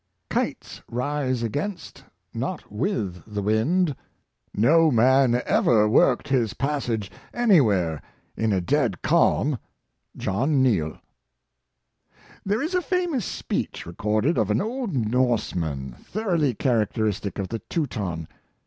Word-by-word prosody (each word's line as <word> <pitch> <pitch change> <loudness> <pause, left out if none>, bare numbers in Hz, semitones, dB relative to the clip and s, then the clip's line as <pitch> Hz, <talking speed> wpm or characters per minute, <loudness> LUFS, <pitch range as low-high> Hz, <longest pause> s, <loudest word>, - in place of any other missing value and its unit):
Kites - - -3
rise 130 0 -1
against, 155 - -4 0.3
not - - -4
with 105 - -2
the 105 -1 -2
wind. 140 - +2 0.6
No 160 +10 +4
man 125 0 +4
ever 105 -3 +3
worked 120 +5 +3
his 120 -6 +1
passage 125 -7 -2 0.2
anywhere 105 - +3 0.3
in 110 -1 0
a 95 - +2
dead 120 - 0
calm." 140 -4 +2 0.3
— - - -28
Jno. 110 +10 -1
Neal. 120 - +2 1.5
^|HERE 210 +6 +1
is 325 +4 -3
a 365 - +2
famous 350 - -1
speech - - -3
recorded 105 - 0
of 110 -2 +1
an 105 +2 +2
old 235 - -3
Norseman, 105 - 0
thoroughly 170 - -1
characteristic 110 -4 0
of 100 -2 -3
the 115 - -3
Teuton. 100 - -3
120 Hz, 115 wpm, -24 LUFS, 105-150 Hz, 1.5 s, No